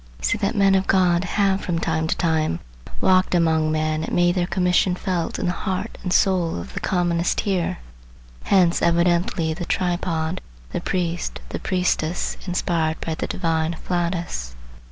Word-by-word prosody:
I - - -16
see 230 - +1
that 205 +2 0
men 195 -1 +4
of 190 0 +2
God 180 -2 +3
have 195 0 +1
from 175 -2 -2
time 160 -1 0
to - - -1
time 160 - +1 0.4
walked 185 -1 +3
among 160 -2 +2
men 155 0 0
and - - -3
made 175 0 +4
their 175 -1 0
commission 180 0 +2
felt 180 -3 -2
in - - -2
the 175 - +1
heart 190 +4 -3
and 180 - -3
soul 180 -3 +2
of 85 - -8
the - - -3
commonest 175 -2 0
hearer. 190 -4 -1 0.7
Hence 180 -3 +3
evidently 170 -1 +2
the 175 +2 -5
tripod, 175 -2 -1 0.3
the - - -3
priest, 175 -2 -2
the - - -4
priestess 180 -2 -1
inspired 165 -3 0
by 165 - -3
the - - -3
divine 165 -2 -1
afflatus. 170 - -3
175 Hz, 165 wpm, -22 LUFS, 165-185 Hz, 0.7 s, men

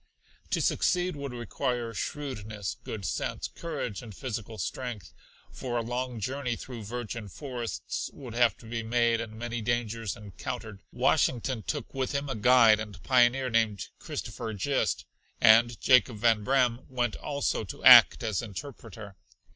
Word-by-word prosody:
To - - 0
succeed 180 -1 +1
would 140 -2 -5
require 120 0 -3
shrewdness, 105 -7 -4
good 105 -3 -6
sense, - - -2
courage 150 - -5
and 110 -5 -10
physical 115 -3 -5
strength 110 - -5 0.4
for 120 -2 -4
a 115 - 0
long 125 0 -3
journey 125 +2 -2
through 115 -2 -8
virgin 115 -1 -5
forests 120 +1 -5
would 125 -5 -10
have 120 -3 +3
to - - -16
be 115 +1 -3
made 115 0 +2
and 110 -1 -7
many 120 0 -4
dangers 115 -2 -2
encountered. 105 +1 -7
Washington 125 -1 +1
took 145 +2 -4
with 135 0 -2
him 140 0 -2
a 135 - -2
guide 115 -1 +6
and 105 -6 -8
pioneer 125 0 +3
named 110 -4 +1
Christopher 110 -2 -5
Gist, 115 - 0 0.3
and 115 0 +6
Jacob 125 -3 +4
Van 110 -1 +3
Braam 125 -1 +2
went 125 -3 -1
also 140 -5 -1
to 90 - -9
act - - +9
as 110 -4 -1
interpreter. 110 -3 -9
120 Hz, 145 wpm, -28 LUFS, 110-130 Hz, 0.4 s, act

